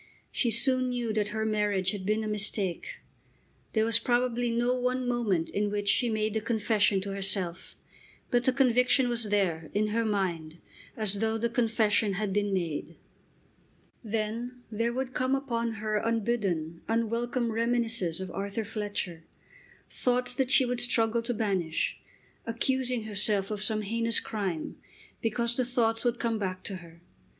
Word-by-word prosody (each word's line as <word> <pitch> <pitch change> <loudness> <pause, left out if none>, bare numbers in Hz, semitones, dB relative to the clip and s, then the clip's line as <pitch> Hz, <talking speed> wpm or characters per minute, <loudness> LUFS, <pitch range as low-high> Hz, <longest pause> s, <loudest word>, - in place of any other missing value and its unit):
She 240 - +1
soon 255 +3 +2
knew 240 -3 -1
that 210 -1 +1
her 220 +1 -2
marriage 205 -3 +1
had 200 -2 -5
been 215 +1 +1
a - - -3
mistake. 210 - -1 0.8
There 220 -1 +3
was 230 -1 +6
probably 245 0 +1
no 240 +2 +1
one 250 0 0
moment 215 -9 0
in 205 +1 0
which 205 0 -2
she 240 +4 +3
made 215 -1 0
the 220 - 0
confession 215 -3 +2
to 200 +1 -4
herself. 190 -3 0 0.6
But 245 0 +2
the 260 - +5
conviction 250 0 +3
was 235 -1 -2
there, 185 -6 0
in 210 +1 +2
her 230 +2 +1
mind, 175 -7 -1 0.4
as 205 -2 0
though 220 +1 +1
the 235 +1 -1
confession 220 -3 +2
had 200 0 -2
been 205 0 +1
made. 170 -3 -2 1.1
Then 230 +3 -3
there 230 +2 0
would 260 +1 -3
come 255 +1 +1
upon 235 -4 -1
her 215 0 -1
unbidden, 205 -8 -1
unwelcome 230 +1 0
reminiscences 230 -6 0
of 190 -1 -5
Arthur 200 +3 -3
Fletcher, 205 -6 -4 0.6
thoughts 250 0 0
that 255 0 0
she 260 - +5
would 245 0 -1
struggle 235 -1 +2
to 230 +2 -2
banish, 190 -7 -1 0.5
accusing 250 +1 0
herself 205 -1 0
of 210 -1 -3
some 215 0 +1
heinous 230 +2 +1
crime 190 -8 -3 0.4
because 235 +1 0
the 255 - +1
thoughts 230 -2 0
would 240 -1 +1
come 230 -2 -1
back 185 -2 -3
to 195 - -4
her. 170 -1 -15
220 Hz, 160 wpm, -29 LUFS, 200-240 Hz, 1.1 s, was